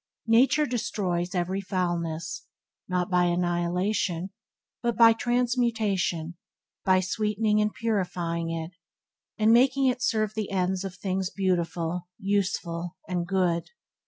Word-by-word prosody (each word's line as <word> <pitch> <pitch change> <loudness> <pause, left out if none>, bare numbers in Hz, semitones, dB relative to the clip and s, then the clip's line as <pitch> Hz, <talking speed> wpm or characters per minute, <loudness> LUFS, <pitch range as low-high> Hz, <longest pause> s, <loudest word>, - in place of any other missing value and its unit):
Nature 255 +7 +4
destroys 185 -8 -2
every 185 +2 -1
foulness, 170 -4 -3 0.4
not 180 -1 0
by 180 0 +4
annihilation, 175 +1 0 0.5
but 235 -2 -1
by 230 -1 +8
transmutation, 225 -8 0 0.5
by 185 -1 +4
sweetening 210 +3 +1
and 210 0 +1
purifying 175 -6 -1
it, 165 0 -4 0.7
and 220 +1 +4
making 265 +3 +4
it 250 -1 +1
serve 215 -3 +1
the 215 -2 -3
ends 190 0 0
of 190 -2 -6
things 190 -1 -2
beautiful, 175 -3 -1
useful 185 -3 -2
and 175 -2 -2
good. 180 -3 0
185 Hz, 115 wpm, -27 LUFS, 175-215 Hz, 0.7 s, by